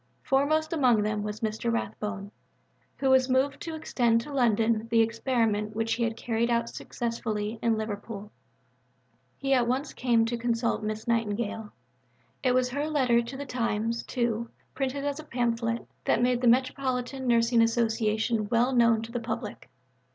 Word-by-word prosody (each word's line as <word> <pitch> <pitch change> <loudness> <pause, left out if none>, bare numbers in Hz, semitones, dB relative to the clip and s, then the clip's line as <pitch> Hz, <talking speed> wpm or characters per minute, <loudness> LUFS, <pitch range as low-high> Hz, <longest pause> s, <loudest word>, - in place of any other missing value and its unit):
Foremost 310 +4 +1
among 250 -9 +3
them 210 0 -1
was 210 +1 -5
Mr. 220 +1 -1
Rathbone, 210 -2 -3 0.7
who 265 -1 +2
was 260 0 +4
moved 260 +2 +1
to 325 -1 -5
extend 240 -7 +1
to 290 +4 -8
London 230 -3 +2
the 230 0 +4
experiment 225 -2 0
which 225 0 0
he 235 - -1
had 225 -1 -1
carried 235 0 0
out 235 0 +1
successfully 225 -2 -3
in 230 -1 +2
Liverpool. 210 -1 -5 1.1
He 275 0 0
at 245 -3 +3
once 260 +5 -1
came 235 -3 +2
to 235 +1 -2
consult 230 -1 0
Miss 215 +1 -4
Nightingale. 220 -1 -1 0.7
It 255 -2 +2
was 255 0 +2
her 285 +4 -2
letter 255 -6 +3
to 235 +3 -7
the 285 - -5
Times, 230 -2 -1
too, 235 -2 -2 0.2
reprinted 275 +1 -2
as 285 +1 -2
a - - -7
pamphlet, 235 -3 -1 0.2
that - - +3
made 250 0 +2
the 250 - +2
"Metropolitan 260 +1 +1
Nursing 235 0 +4
Association" 225 -1 +1
well 240 +3 +2
known 230 -2 +4
to 230 - -8
the 240 - -2
public. 230 - -5
235 Hz, 160 wpm, -28 LUFS, 225-255 Hz, 1.1 s, was